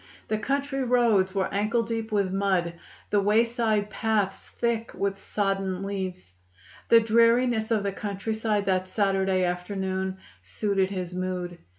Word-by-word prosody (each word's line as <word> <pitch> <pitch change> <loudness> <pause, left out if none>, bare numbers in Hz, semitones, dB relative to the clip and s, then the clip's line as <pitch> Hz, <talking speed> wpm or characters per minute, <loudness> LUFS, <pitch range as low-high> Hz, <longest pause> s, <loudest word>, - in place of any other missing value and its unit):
The 215 0 0
country 275 +3 -1
roads 230 -6 +3
were 190 -1 0
ankle 215 +4 +1
deep 225 -1 -4
with 200 -3 +1
mud, 190 -3 +1 0.4
the 205 - +3
wayside 220 0 +2
paths 215 -4 -1
thick 230 -1 -2
with 195 0 -2
sodden 195 -2 -1
leaves. 185 - -5 0.6
The 230 - +8
dreariness 230 0 +3
of 220 -3 +1
the 200 - -1
countryside 210 +1 -2
that 185 -1 +1
Saturday 190 -1 +1
afternoon 190 +1 -2 0.2
suited 195 -3 0
his 185 -2 -4
mood. 180 -1 -3
200 Hz, 130 wpm, -26 LUFS, 190-225 Hz, 0.6 s, The